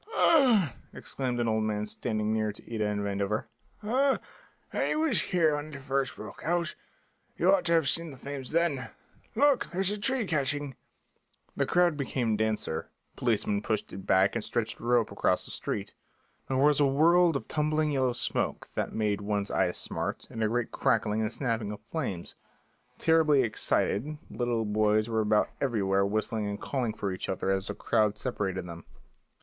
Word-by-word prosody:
"Ah," 235 - +4 0.2
exclaimed 125 -3 -2
an 120 - +1
old 110 -1 +1
man, 105 -1 -1
standing 110 0 -1
near 110 -1 0
to 105 - -12
Ida 110 -2 0
and 105 0 -1
Vandover, 100 +1 -1 0.4
"ah, 265 +5 +2 0.6
I - - 0
was 310 -7 +2
here 165 -5 +2
when 145 +1 -5
it - - -7
first 135 -1 -1
broke 105 - -9
out; 170 +1 0 0.6
you 185 +3 +4
ought 185 -2 +2
to 170 - +3
have 165 -4 +3
seen 165 +4 0
the 135 - -10
flames 135 -1 -5
then! 160 -6 +1 0.5
Look, 280 -5 +3
there's 190 +2 0
a 210 - -3
tree 260 +1 0
catching!" 145 -4 -1 0.8
The - - 0
crowd 175 -3 +3
became 125 -5 0
denser; 110 -7 -1 0.3
policemen 105 -3 0
pushed 110 0 -2
it 95 - -8
back 95 +1 +4
and 115 - -2
stretched 115 -2 -2
a - - -12
rope 120 -1 +2
across - - +1
the - - -4
street. - - -3 0.5
There 130 - 0
was 145 +2 +4
a 145 - +5
world 165 +4 +4
of 140 - -3
tumbling 155 0 +1
yellow 130 -3 +1
smoke - - -1
that - - -2
made 105 -2 0
one's 100 0 -1
eyes - - +1
smart, - - -3
and 110 - -2
a - - +3
great 120 +1 -1
crackling 110 -1 +1
and 110 0 -1
snapping 115 -4 -2
of 105 - -7
flames. 110 - -4 0.6
Terribly 155 -4 +4
excited 120 +4 0
little 120 -2 -1
boys 105 +1 +2
were 110 -1 +1
about 105 0 +2
everywhere 100 -6 +1
whistling 110 +1 -1
and 100 0 -4
calling 125 -5 -2
for 100 - -2
each 95 - -5
other 95 +1 -1
as 95 0 0
the 100 - -4
crowd 105 -1 +1
separated 95 -6 -2
them. 85 -1 -8
120 Hz, 175 wpm, -29 LUFS, 105-155 Hz, 0.8 s, a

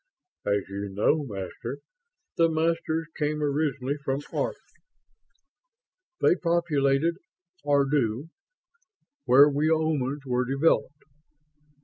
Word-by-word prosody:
"As 100 -1 +1
you 100 +1 -5
know, 110 +10 +1
Master, 95 -4 -6 0.6
the 165 0 +4
Masters 160 0 0
came 150 0 -1
originally 140 -2 -1
from 135 0 -1
Arth. - - -1 1.6
They - - +5
populated 165 -3 +1 0.5
Ardu, 140 -2 +1 1.0
where 140 +3 +7
we 150 +2 +1
Omans 150 -3 0
were 125 -1 0
developed. 145 +1 +1
145 Hz, 90 wpm, -26 LUFS, 130-160 Hz, 1.6 s, where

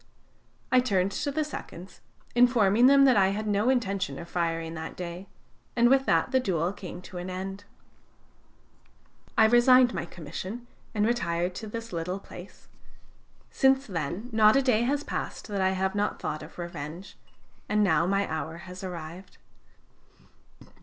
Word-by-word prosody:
"I 255 - +6
turned 195 -6 +1
to 285 - -2
the 310 +2 0
seconds, 185 - -9 0.3
informing 240 -2 +5
them 275 0 +6
that 260 - +5
I 190 -1 +5
had 205 +3 -2
no 210 +3 +1
intention 195 - 0
of 170 - -8
firing 165 -1 -2
that 160 0 -6
day, 180 +2 -7 0.5
and 240 0 +4
with 270 0 +3
that - - +2
the 260 - +4
duel 180 -6 -1
came 180 -2 -9
to 180 - -8
an 180 +1 -5
end. 195 +2 -6 1.7
"I 220 - +7
resigned 245 +2 +6
my - - -3
commission 185 +8 -7 0.3
and 210 0 +2
retired 180 -7 0
to 220 +4 -7
this 230 0 -7
little 170 +3 -3
place. 180 -1 -13 0.8
Since 270 0 +3
then 180 - -4
not 220 0 +5
a 275 - +4
day 245 -4 +3
has 280 +4 0
passed - - -5
that 200 -2 -2
I 190 - +3
have 190 0 -1
not 205 0 -1
thought 155 0 -4
of - - -12
revenge. 170 +1 -7 0.5
And 210 0 +3
now 170 -4 +3
my 200 +1 +1
hour 160 +1 -4
has 180 +1 -9
arrived." 175 0 -8
195 Hz, 160 wpm, -27 LUFS, 175-240 Hz, 1.7 s, I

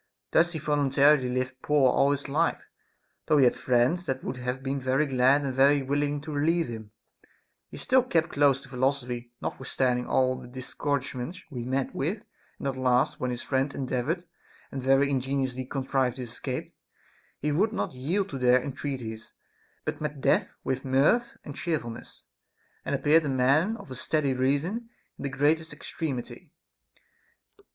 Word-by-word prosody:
Thus 170 +2 +3
he - - -3
voluntarily 145 -2 +3
lived 130 +1 -2
poor 145 -4 +4
all 140 - +3
his 140 0 -1
life, 155 +4 0 0.6
though 155 - +4
he 140 - +6
had 125 - +4
friends 130 +8 +2
that 130 0 -3
would 125 - -4
have 125 +1 -4
been 135 0 -2
very 130 +3 +2
glad 135 +1 +3
and 135 -2 -2
very 140 +2 +4
willing 145 +1 0
to 155 +1 -7
relieve 165 +3 +1
him; 110 -2 -7 0.8
he - - -9
still 260 0 +3
kept 170 -10 +1
close 140 -2 +3
to 140 - -15
philosophy, 125 -2 -1
notwithstanding 125 -2 -1
all 130 0 +2
the - - -10
discourage 130 +2 -3
ments 155 +9 -6
he 120 -3 -5
met 130 +1 -1
with; 190 +11 -2 0.3
and - - -4
at 135 -1 -2
last, 130 +2 +2
when 125 - -1
his 120 0 -4
friends 135 +1 0
endeav 130 -2 -2
ored 175 +2 -1 0.5
and 135 - -4
very 135 +2 +4
ingeniously 130 -1 -1
contrived 130 -1 -1
his 125 -3 -6
escape, 125 +1 -5 0.6
he 150 - -1
would 195 +9 +2
not - - -2
yield 170 +10 -1
to 135 - -5
their 125 0 +5
entreaties, 125 -5 -5 0.5
but - - -3
met 150 -2 -3
death - - +2
with 130 0 -2
mirth 140 - +2
and 145 - -8
cheerfulness, 145 -9 -4 0.6
and - - -1
appeared 150 +4 +4
a 145 - -2
man 140 - +2
of 140 - -12
a - - -5
steady 140 +1 0
reason 145 - 0 0.3
in - - -7
the - - -1
greatest 150 +4 +1
extremity. 150 -4 -5
135 Hz, 170 wpm, -27 LUFS, 130-150 Hz, 0.8 s, he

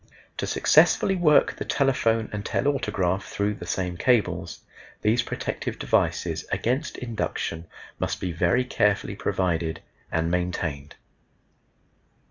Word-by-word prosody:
To - - -2
successfully 195 - +4
work 160 -5 +4
the - - -3
telephone 115 -5 +1
and 105 -1 -3
telautograph 95 -10 0
through 100 +1 -1
the 90 -4 -9
same 90 -1 -2
cables, 120 +2 +1 0.4
these 110 +3 +3
protective - - -4
devices - - 0
against 125 +4 -1
induction 95 -8 -3 0.3
must - - -2
be 90 - -2
very 90 +9 +2
carefully 105 -5 +1
provided 80 -3 -1 0.3
and 80 +1 0
maintained. 85 -5 -2
100 Hz, 110 wpm, -25 LUFS, 85-120 Hz, 0.4 s, successfully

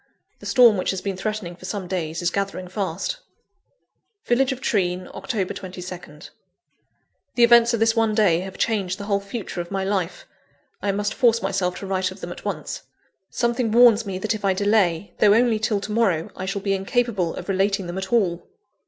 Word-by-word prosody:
The - - -9
storm 235 -5 +6
which 185 - -1
has 190 - -1
been 195 -1 -3
threatening 200 -3 -4
for 185 - -12
some 190 -1 -4
days, 170 -2 -3
is 175 - +1
gathering 195 -1 -3
fast. 205 - -3 1.1
(Village 260 +3 +2
of 260 - -4
Treen, 185 -7 0
October 205 -8 -3
22nd.) 180 -5 -9 1.0
The 240 - +4
events 235 0 +6
of - - -3
this 225 +1 +3
one 225 -2 +2
day 195 -7 +4
have 190 +1 -7
changed 195 -5 0
the 205 - -7
whole 200 -1 0
future 200 -2 -5
of 170 - -8
my 195 -1 -2
life. 190 -3 -2 0.6
I 200 - +1
must 205 +1 -1
force 230 -3 +3
myself 180 -2 -1
to - - -5
write 190 -1 0
of 185 +2 -11
them 175 - -6
at - - -9
once. - - -4 0.5
Something 235 -1 0
warns 235 -1 +6
me 195 -3 -4
that 215 +4 -1
if 215 -1 -6
I 195 -1 +2
delay, 200 -3 +1
though 205 0 +6
only 230 -2 +3
till 215 -2 0
to 205 +2 -6
morrow, 195 -8 +1
I 185 - -5
shall 195 0 -3
be 195 -2 +1
incapable 195 -2 0
of - - -7
relating 195 0 +1
them 175 +2 -4
at 190 0 -6
all. 185 -7 +1
200 Hz, 195 wpm, -23 LUFS, 185-225 Hz, 1.1 s, storm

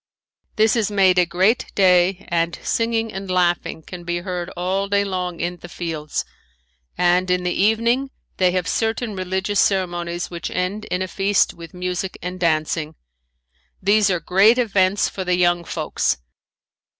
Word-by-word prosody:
This 220 +1 +3
is 220 -3 +1
made 190 -3 +4
a 180 - +3
great 190 +7 +2
day 185 0 +3
and 170 0 0
singing 225 -1 0
and 195 0 -6
laughing 175 -3 0
can 180 +1 -9
be 175 0 -2
heard 180 -1 -4
all 190 +3 -1
day 200 0 +2
long 180 -3 -3
in 175 +1 -2
the 175 - -11
fields, 160 -3 -4 0.7
and 180 +1 +2
in 180 0 +1
the 180 0 0
evening 230 +6 +2 0.3
they 185 -1 +4
have 180 -1 -1
certain 225 -1 -1
religious 190 +2 -1
ceremonies 175 -3 0
which 170 -2 -5
end 190 +4 -2
in 180 +1 -2
a - - -4
feast 195 +1 +1
with 170 0 -12
music 180 +1 -3
and 180 +1 -6
dancing. 155 -1 0 0.8
These 205 +1 +3
are 180 -2 +1
great 200 +7 +4
events 200 -5 +2
for 190 - -5
the 180 0 +1
young 175 -1 +2
folks. - - -1
185 Hz, 160 wpm, -21 LUFS, 175-200 Hz, 0.8 s, made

